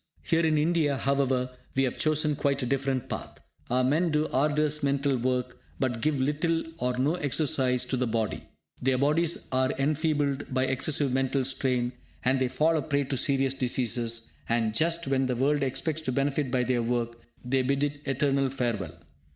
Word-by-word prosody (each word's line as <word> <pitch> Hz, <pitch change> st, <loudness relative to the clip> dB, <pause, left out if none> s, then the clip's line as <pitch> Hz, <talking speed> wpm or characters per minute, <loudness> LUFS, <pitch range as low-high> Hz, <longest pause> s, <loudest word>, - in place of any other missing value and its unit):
Here 165 Hz, 0 st, +2 dB
in 155 Hz, -1 st, +3 dB
India, 150 Hz, -2 st, +2 dB
however, 130 Hz, -2 st, 0 dB, 0.2 s
we 135 Hz, -, +3 dB
have 130 Hz, -, -1 dB
chosen 155 Hz, -1 st, +1 dB
quite 140 Hz, -1 st, 0 dB
a -, -, 0 dB
different 135 Hz, -1 st, -1 dB
path! -, -, -6 dB, 0.3 s
Our 125 Hz, +1 st, +2 dB
men 155 Hz, +7 st, +2 dB
do 150 Hz, 0 st, +1 dB
arduous 150 Hz, +2 st, +1 dB
mental 140 Hz, 0 st, +1 dB
work, 125 Hz, 0 st, -1 dB, 0.2 s
but 120 Hz, -4 st, -1 dB
give 150 Hz, 0 st, +1 dB
little 155 Hz, +5 st, 0 dB, 0.2 s
or 125 Hz, 0 st, -1 dB
no 140 Hz, +5 st, +2 dB
exercise 135 Hz, -5 st, +1 dB
to 130 Hz, +1 st, -2 dB
the 125 Hz, 0 st, 0 dB
body. 115 Hz, -2 st, -2 dB, 0.3 s
Their 130 Hz, 0 st, +2 dB
bodies 155 Hz, +5 st, +1 dB
are 130 Hz, +1 st, +2 dB
enfeebled 145 Hz, -1 st, 0 dB
by 130 Hz, 0 st, +1 dB
excessive 135 Hz, +1 st, +1 dB
mental 135 Hz, 0 st, +1 dB
strain, 125 Hz, -2 st, 0 dB, 0.3 s
and 130 Hz, +1 st, +2 dB
they 130 Hz, -, +3 dB
fall 160 Hz, +5 st, +2 dB
a -, -, 0 dB
prey 145 Hz, -2 st, 0 dB
to 135 Hz, 0 st, -3 dB
serious 135 Hz, 0 st, +1 dB
diseases; 120 Hz, -3 st, 0 dB, 0.2 s
and 115 Hz, -2 st, +1 dB
just 170 Hz, +6 st, +1 dB
when 135 Hz, -1 st, +1 dB
the 125 Hz, -, -1 dB
world 140 Hz, +4 st, +1 dB
expects 140 Hz, +4 st, -1 dB
to 130 Hz, -, -2 dB
benefit 140 Hz, +1 st, 0 dB
by 125 Hz, 0 st, +1 dB
their 125 Hz, -1 st, +1 dB
work, 115 Hz, 0 st, -2 dB, 0.3 s
they 130 Hz, +1 st, +2 dB
bid 140 Hz, +2 st, 0 dB
it 145 Hz, 0 st, -2 dB
eternal 135 Hz, 0 st, +1 dB
farewell! 120 Hz, -, -3 dB
135 Hz, 180 wpm, -27 LUFS, 125-145 Hz, 0.3 s, in